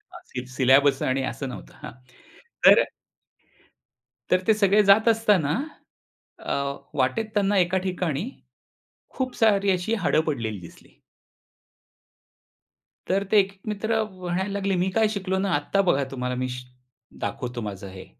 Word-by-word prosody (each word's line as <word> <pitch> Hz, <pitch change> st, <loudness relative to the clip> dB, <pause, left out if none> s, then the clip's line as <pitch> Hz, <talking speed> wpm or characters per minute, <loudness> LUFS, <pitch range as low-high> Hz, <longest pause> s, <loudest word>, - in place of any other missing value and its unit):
अंतिम 125 Hz, 0 st, -8 dB
सिलेबस 135 Hz, +1 st, +4 dB
आणि 130 Hz, +1 st, 0 dB
असं 135 Hz, 0 st, -4 dB
नव्हतं -, -, -10 dB
हां. -, -, -6 dB, 0.7 s
तर -, -, +8 dB, 1.5 s
तर 185 Hz, -, +4 dB
ते 220 Hz, -, +6 dB
सगळे 210 Hz, 0 st, +3 dB
जात 200 Hz, +3 st, +5 dB
असताना 210 Hz, -9 st, +3 dB, 0.9 s
अ, -, -, -3 dB, 0.4 s
वाटेत 135 Hz, -, +1 dB
त्यांना 205 Hz, -1 st, +2 dB
एका 180 Hz, 0 st, +2 dB
ठिकाणी 180 Hz, -, -2 dB, 0.9 s
खूप 255 Hz, -1 st, -2 dB
सारी 200 Hz, -4 st, +3 dB
अशी 185 Hz, +4 st, 0 dB
हाडं 155 Hz, -, +3 dB
पडलेली 115 Hz, -, -3 dB
दिसली. 85 Hz, -, -16 dB, 2.1 s
तर 195 Hz, +2 st, +1 dB
ते 215 Hz, -, +6 dB
एक-एक 195 Hz, 0 st, -1 dB
मित्र 220 Hz, +2 st, 0 dB
म्हणायला 185 Hz, -1 st, -4 dB
लागले, 200 Hz, -1 st, -1 dB
"मी 180 Hz, +1 st, +1 dB
काय 220 Hz, -1 st, +4 dB
शिकलो 190 Hz, -3 st, -2 dB
ना, 195 Hz, +1 st, -1 dB
आत्ता 170 Hz, +7 st, +1 dB
बघा 140 Hz, -4 st, +3 dB
तुम्हाला 125 Hz, -1 st, -3 dB
मी 130 Hz, +1 st, -2 dB
श 125 Hz, 0 st, -6 dB, 0.6 s
दाखवतो 125 Hz, -2 st, -4 dB
माझं 100 Hz, -1 st, -6 dB
हे, 95 Hz, 0 st, -10 dB
185 Hz, 135 wpm, -24 LUFS, 130-200 Hz, 2.1 s, तर